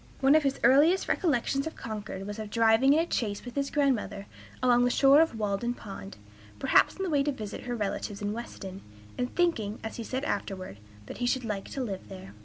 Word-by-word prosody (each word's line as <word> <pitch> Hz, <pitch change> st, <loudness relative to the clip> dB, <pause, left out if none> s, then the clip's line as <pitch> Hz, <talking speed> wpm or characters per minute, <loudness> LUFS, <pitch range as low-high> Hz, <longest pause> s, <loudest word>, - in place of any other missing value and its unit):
One 270 Hz, +1 st, +5 dB
of 310 Hz, -, +6 dB
his 275 Hz, -2 st, -1 dB
earliest 290 Hz, +9 st, +5 dB
recollections 275 Hz, -3 st, 0 dB
of 320 Hz, -, -7 dB
Concord 210 Hz, -4 st, -6 dB
was 205 Hz, +2 st, -6 dB
of 215 Hz, -1 st, -5 dB
driving 230 Hz, +5 st, +4 dB
in 315 Hz, -, +4 dB
a -, -, -7 dB
chaise 205 Hz, -2 st, -2 dB
with 245 Hz, -, -7 dB
his 280 Hz, -1 st, -1 dB
grandmother 225 Hz, -9 st, 0 dB, 0.4 s
along 245 Hz, -1 st, +5 dB
the 245 Hz, -, +3 dB
shore 275 Hz, +4 st, +6 dB
of 320 Hz, -8 st, +1 dB
Walden 215 Hz, +3 st, -1 dB
Pond, 195 Hz, -2 st, -9 dB, 0.4 s
perhaps -, -, +3 dB
on 385 Hz, -, -3 dB
the 375 Hz, -, -1 dB
way 285 Hz, -2 st, +3 dB
to 290 Hz, +1 st, 0 dB
visit 220 Hz, -5 st, -7 dB
her 245 Hz, -1 st, -2 dB
relatives 205 Hz, -1 st, -3 dB
in 205 Hz, 0 st, -2 dB
Weston, 195 Hz, -4 st, -7 dB, 0.3 s
and 250 Hz, 0 st, -3 dB
thinking, 230 Hz, -, +1 dB
as 220 Hz, -, -6 dB
he 235 Hz, -, -4 dB
said 260 Hz, +4 st, -3 dB
afterward, 190 Hz, -, -4 dB, 0.3 s
that -, -, -9 dB
he 245 Hz, -, 0 dB
should 250 Hz, 0 st, 0 dB
like 205 Hz, -3 st, -4 dB
to 270 Hz, -, -3 dB
live 195 Hz, -5 st, -6 dB
there. 185 Hz, -, -10 dB
235 Hz, 215 wpm, -28 LUFS, 205-275 Hz, 0.4 s, of